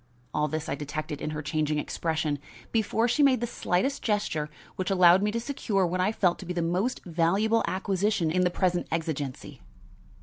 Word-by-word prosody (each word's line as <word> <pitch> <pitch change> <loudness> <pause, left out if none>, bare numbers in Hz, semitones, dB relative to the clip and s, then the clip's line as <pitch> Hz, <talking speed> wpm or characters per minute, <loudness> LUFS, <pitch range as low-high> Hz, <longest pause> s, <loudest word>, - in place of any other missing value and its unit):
All 150 0 +1
this 155 +1 -3
I - - -1
detected 150 +1 -5
in - - -2
her 150 0 -4
changing 150 0 0
expression, 155 -1 -1 0.3
before 225 +1 +1
she 245 +5 +2
made 275 -3 +5
the 240 - -1
slightest 235 +4 -1
gesture 180 -8 -1 0.3
which 185 +1 -2
allowed 180 -1 +6
me 210 - +1
to 230 +2 -1
secure 225 -6 0
what 180 +1 -1
I 190 - +2
felt 180 -5 +1
to 190 - -8
be 180 - -2
the 170 -1 -1
most 185 +10 -1
valuable 190 +7 +2
acquisition 190 -2 0
in 180 +2 +2
the 180 - +3
present 180 -1 0
exigency. 155 -5 -4
180 Hz, 190 wpm, -27 LUFS, 155-210 Hz, 0.3 s, allowed